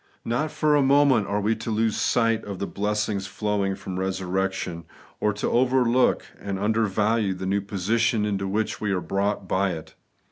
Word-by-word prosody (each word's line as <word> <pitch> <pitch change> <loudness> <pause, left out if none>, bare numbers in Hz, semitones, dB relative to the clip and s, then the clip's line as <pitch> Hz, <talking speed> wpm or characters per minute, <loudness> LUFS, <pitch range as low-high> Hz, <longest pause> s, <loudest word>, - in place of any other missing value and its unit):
Not 125 +7 0
for 150 0 +2
a 145 - +4
moment 135 -5 +4
are 100 - 0
we 105 +2 +1
to 115 - -5
lose 110 0 +1
sight 115 -1 +1
of 100 -2 -6
the 100 - -2
blessings 105 -1 -2
flowing 100 -1 -1
from 95 -1 -6
resurrection, 95 -2 -2 0.3
or 105 - +2
to 105 - -2
overlook 125 0 +3
and 100 -1 -4
undervalue 105 0 +1
the 95 +1 -5
new 100 +2 +1
position 105 +3 0
into 100 -2 -1
which 105 +3 -2
we 105 -2 0
ai 95 - +1
e - - -3
brought 100 0 -1
by 95 0 +1
it. 80 -1 -9
105 Hz, 180 wpm, -25 LUFS, 95-115 Hz, 0.3 s, a